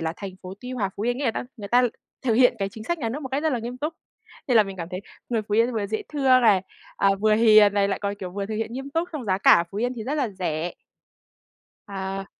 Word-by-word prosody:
là 160 0 -2
thành 195 -2 -7
phố 185 +1 -7
Tuy 250 0 -7
Hòa, 210 -7 -1
Phú 200 - -4
Yên, 245 +2 0
nghĩa 285 - -2
là 230 - +3
ta - - -4
người 205 -3 -7
ta 245 +3 +4 0.4
thực 240 -4 +1
hiện 250 +2 +5
cái 195 -1 -1
chính 215 +2 -10
sách 345 +6 -1
nhà 230 - -2
nước 280 +7 -5
một 265 - -5
cách 275 +3 -2
rất 315 - +1
là 250 - 0
nghiêm 240 +2 -6
túc. 310 +4 -3 0.5
Thế 250 - +3
là 220 - +7
mình 195 -1 -7
cảm 170 -2 -5
thấy 185 0 -4 0.3
người 230 -3 0
Phú 205 0 -3
Yên 230 +3 +3
vừa 215 -3 -1
dễ 215 +2 -3
thương 265 -3 +4
này, 205 -6 +4 0.3
à, 200 - +3
vừa 215 0 +4
hiền 215 -2 +6
này, 200 -1 +2
lại 195 - -1
còn, 200 0 -1
kiểu, 190 -3 -7
vừa 200 +2 -4
thực 215 - -4
hiện 225 +1 -3
nghiêm 270 +3 -6
túc, 330 +4 -1
xong 295 -5 -5
giá 190 -3 +1
cả - - +5
ở 170 - +5
Phú 200 - -5
Yên 245 +2 -1
thì 225 - -6
rất 275 - -2
là 275 -6 0
rẻ. 175 -3 -3 1.2
À. 195 -1 -4
220 Hz, 290 wpm, -24 LUFS, 195-250 Hz, 1.2 s, là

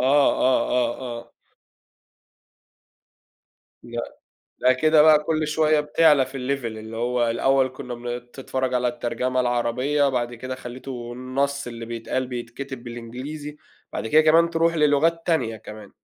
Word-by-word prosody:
آه، 130 -1 +3
آه، 125 -1 +1 0.2
آه. 115 0 -14 2.5
لأ، 120 0 -6 0.4
لأ 130 0 +4
كده 155 +4 +4
بقى 150 -1 +6
كل 155 0 0
شوية 155 0 +3
بتعلى 150 -2 +4
في 130 - -14
الLeve 135 0 -2
اللي 110 0 -6
هو 120 0 +1
الأول 135 +3 +2
كنّا 125 -1 -8
بن 120 0 -4
بتتفرَّج 130 +1 -4
على 125 0 +1
الترجمة 120 +1 -2
العربية، 125 +4 +1
بعد 120 -2 -2
كده 130 +2 -6
خلّيته 125 -1 -7
النَصّ 135 +2 -2
اللي 115 -1 -7
بيتقال، 120 +2 -3
بيتكتب 125 +1 -6
بالإنجليزي، 130 +6 -7 0.4
بعد - - -3
كده 155 +7 +5
كمان 165 +2 +5
ترُوح 165 0 +1
للُغات 155 +2 +3
تانية 135 -10 0
كمان. 105 -1 -11
130 Hz, 135 wpm, -23 LUFS, 120-145 Hz, 2.5 s, بقى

